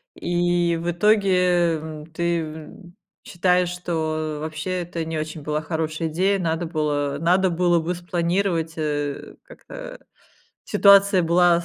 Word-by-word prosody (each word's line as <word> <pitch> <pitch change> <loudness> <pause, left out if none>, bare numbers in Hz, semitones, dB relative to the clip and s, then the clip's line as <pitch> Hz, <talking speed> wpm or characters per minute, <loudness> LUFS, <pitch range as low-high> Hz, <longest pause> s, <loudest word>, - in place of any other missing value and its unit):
и 175 -1 0
в 170 - -2
итоге, 180 -3 +3
эм, 155 -1 -8
ты, 170 +1 -1
ум, 160 +4 -11 0.3
считаешь, 180 0 +1
что 160 -3 -3
вообще 155 +4 -3
это 170 -1 -5
не 160 0 -4
очень 155 0 -5
была 150 +1 -2
хорошая 160 0 -3
идея, 190 +5 +1
надо 165 -1 -1
было 145 -3 -1
надо 180 +4 +3
было 175 0 +2
бы 170 +3 -2
спланировать, 175 -1 -1
э, 145 -2 -3
как-то, - - -11 0.7
ситуация 200 -2 +5
была 170 0 +3
170 Hz, 130 wpm, -23 LUFS, 155-180 Hz, 0.7 s, ситуация